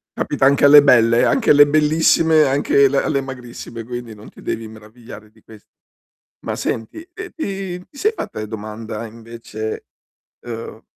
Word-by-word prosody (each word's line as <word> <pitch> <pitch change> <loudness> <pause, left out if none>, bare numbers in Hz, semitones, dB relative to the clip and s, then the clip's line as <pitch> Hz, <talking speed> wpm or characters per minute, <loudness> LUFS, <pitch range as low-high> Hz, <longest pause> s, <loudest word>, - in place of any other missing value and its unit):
Capita - - -1
anche 140 +1 +4
alle 145 0 +8
belle, 115 -4 +4
eh, - - +2
anche 250 - +1
alle 145 0 +7
bellissime, 155 +1 +3
anche 140 0 +3
l 135 - -5
alle 140 +1 0
magrissime, 125 -3 -8
quindi 120 -1 -7
non 105 0 -14
ti - - -17
devi 115 0 -4
meravigliare 110 0 -14
di 110 0 -25
ques 110 -1 -17 0.8
ma - - -3
senti 115 - -5
te 365 0 -8
ti 195 - -5
ti 280 - -18
sei 430 +8 0
fatta 270 - -7
e 110 - -5
domanda 110 +1 -7
invece, 115 -1 -8 0.5
ehm 115 -2 -8
120 Hz, 165 wpm, -19 LUFS, 110-150 Hz, 0.8 s, alle